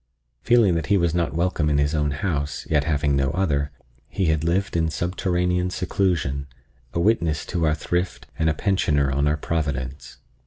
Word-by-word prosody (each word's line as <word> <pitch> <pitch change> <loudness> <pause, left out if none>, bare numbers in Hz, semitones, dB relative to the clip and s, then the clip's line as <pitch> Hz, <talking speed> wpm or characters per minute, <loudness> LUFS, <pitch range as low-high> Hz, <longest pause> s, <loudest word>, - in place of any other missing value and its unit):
Feeling 115 -6 +4
that 80 -3 -1
he 100 - +4
was 85 -3 +1
not 85 -5 0
welcome 85 -3 +1
in 75 - +2
his 70 +1 +1
own 75 -1 +1
house, 75 -1 -2
yet 75 -2 +2
having 75 -2 +1
no 70 -1 +1
other, 75 -7 0 0.4
he 95 - -1
had 80 -1 +1
lived 85 +4 0
in 80 -1 +2
subterranean 90 +2 0
seclusion, 85 -7 -1 0.4
a 85 - -2
witness 85 -6 +1
to 85 -2 0
our 75 - +2
thrift 90 +2 -2
and 80 0 +3
a - - +2
pensioner 75 -8 +1
on 70 +2 +1
our 75 +1 +1
providence. 70 -4 -3
80 Hz, 180 wpm, -23 LUFS, 75-90 Hz, 0.4 s, Feeling